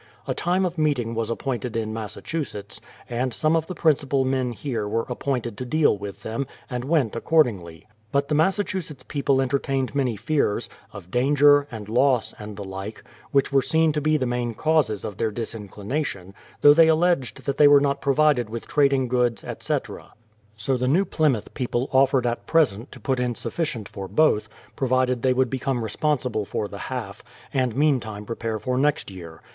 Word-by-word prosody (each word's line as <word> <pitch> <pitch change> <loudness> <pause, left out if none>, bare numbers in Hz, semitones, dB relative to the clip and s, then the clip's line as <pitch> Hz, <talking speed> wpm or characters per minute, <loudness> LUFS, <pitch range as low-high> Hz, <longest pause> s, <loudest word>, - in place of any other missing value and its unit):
A - - 0
time 180 +2 +1
of 175 -2 -3
meeting 135 -7 +1
was 115 -1 -2
appointed 120 -1 -3
in 110 -1 -2
Massachusetts, 110 0 -5 0.3
and 125 +2 -1
some 155 +7 +1
of 160 -1 0
the 185 - -6
principal 140 -4 +2
men 130 -2 0
here 115 -4 -3
were 115 +2 -1
appointed 125 -4 -3
to - - -2
deal 155 -1 +3
with 100 -1 -8
them, 115 +5 -3 0.2
and 125 -1 -3
went 140 -7 +1
accordingly. 105 - +1 0.3
But 140 0 +1
the 150 - -1
Massachusetts 165 -4 0
people 140 -2 +1
enter 135 +1 +1
tained 135 -1 -2
many 130 -5 0
fears, 140 -1 -1 0.2
of 90 - -11
danger, 145 +3 +4
and 110 -5 -8
loss, 125 +2 +2
and 105 -1 -8
the 100 - -5
like, 95 +2 -7 0.3
which 140 0 +2
were 135 -1 +4
seen 160 +4 +2
to 150 0 -2
be 155 +1 +2
the 130 - -1
main 120 -1 -2
causes 155 -10 +1
of 100 - -6
their 110 - 0
disinclination, 105 -1 -5 0.3
though 145 - +9
they 165 +1 +6
alleged 160 -4 +1
that 140 - -1
they 150 - +8
were 145 0 +8
not 140 0 0
provided 140 -4 +3
with 115 +1 -6
trad 140 -2 +3
ing 130 -2 +1
goods, 120 -2 0
etc. - - -4 0.4
So 125 +5 0
the 125 +1 -1
New 175 +9 +3
Plymouth 145 - 0
people 125 0 -2
offered 130 -1 +3
at 120 0 -2
present 130 -7 +2
to - - -11
put 130 -2 -1
in 125 -1 -1
sufficient 120 -11 -3
for 95 -2 -7
both, 105 - +2 0.3
provided 130 -2 +1
they 130 - +3
would 130 -1 +1
become 130 -2 -1
responsible 125 0 -1
for 105 - -3
the 100 - -9
half, 110 -6 -5 0.3
and 130 -4 0
meantime 120 -8 0
prepare 115 0 -3
for 125 +3 -1
next 145 -6 +1
year. 85 -3 -11
130 Hz, 185 wpm, -24 LUFS, 110-145 Hz, 0.4 s, though